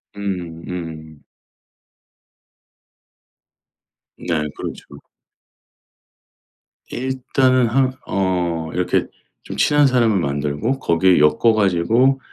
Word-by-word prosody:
음음. 85 -5 -6 2.9
네 80 -3 -2
그렇죠. 70 - -8 1.9
일단은 130 -1 +1
한 130 +3 +1
어 90 -4 -1
이렇게 90 0 0 0.4
좀 - - -8
친한 145 -1 +4
사람을 115 -6 +2
만들고 75 - -2
거기에 90 - +3
엮어 75 +10 +4
가지고 110 +7 +2
95 Hz, 150 characters per minute, -20 LUFS, 80-125 Hz, 2.9 s, 친한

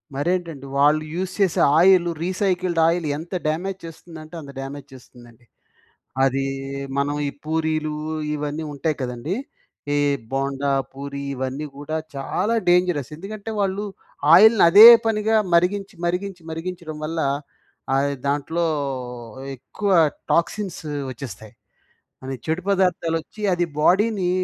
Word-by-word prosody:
మరేంటండి, 165 -1 -2
వాళ్ళు 150 +2 +4
యూజ్ 185 +2 -3
చేసే 195 -4 +2 0.2
oil, 180 0 +6 0.2
recycled 185 -2 0
oil 170 -1 +1
ఎంత 170 +4 -9
డ్యామేజ్ 180 +5 -2
చేస్తుందంటే, 165 0 -11
అంత 140 -2 -10
డ్యామేజ్ 135 +1 -7
చేస్తుందండి. 120 -2 -16 0.8
అది 135 +1 +1 0.5
మనం 145 +1 0
ఈ - - -2
పూరీలు 155 -1 -1 0.4
ఇవన్నీ 150 +1 -3
ఉంటాయి 150 +2 -2
కదండీ! 125 +6 -3 0.6
ఈ - - +2 0.4
బొండా, 135 +1 -1 0.2
పూరి 140 +1 -6
ఇవన్నీ 130 +3 -4
కూడా 145 +2 -4 0.2
చాలా 185 +10 -1
డేంజరస్. 175 -6 +2
ఎందుకంటే 205 +5 -7
వాళ్ళు 200 +1 -1 0.5
ఆయిల్‌ని 220 +4 +7
అదే 210 +6 +11 0.2
పనిగా 220 0 +2 0.2
మరిగించి, 195 +4 +1
మరిగించి, 180 0 -3
మరిగించడం 165 -1 -6
వల్ల 165 +2 -3
ఆహ్, 140 +1 -5 0.6
అది 140 - -1
దాంట్లో 145 +4 -1 0.9
ఎక్కువ 195 - -4 0.4
టాక్సిన్స్ 190 +3 0 0.3
వచ్చేస్తాయి. 110 -4 -9 0.7
అవి 135 0 -4
చెడు 160 +3 0
పదార్థాలు 180 -4 +1
వచ్చి, 210 +6 -14
అది 175 0 +1
బాడీని 195 +3 +3
165 Hz, 120 wpm, -22 LUFS, 140-185 Hz, 0.9 s, అదే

